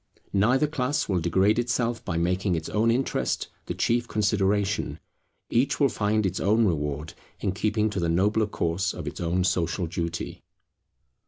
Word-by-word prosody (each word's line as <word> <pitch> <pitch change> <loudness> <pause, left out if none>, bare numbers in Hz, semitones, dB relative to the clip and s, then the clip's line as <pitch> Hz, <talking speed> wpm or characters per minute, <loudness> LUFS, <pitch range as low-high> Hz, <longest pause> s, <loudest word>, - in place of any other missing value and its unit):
Neither 120 +9 +3
class 145 0 -1
will 95 -3 +1
degrade 95 +6 +2
itself 120 -1 0
by 85 -3 -2
making 90 +2 +1
its 80 -1 -4
own 110 +2 +2
interest 125 +3 0 0.2
the - - -3
chief 120 0 +1
consideration: 105 -1 0 0.5
each 130 +4 +2
will 140 -2 +4
find 105 -1 0
its 95 - -1
own 110 +3 +3
reward 75 -3 -2 0.3
in 95 - 0
keeping 105 +2 0
to 100 - -2
the 85 -1 0
nobler 105 +6 +2
course 95 0 -1
of 90 - -6
its 75 - -5
own 90 +2 +1
social 90 0 0
duty. 85 0 -4
100 Hz, 160 wpm, -26 LUFS, 85-115 Hz, 0.5 s, will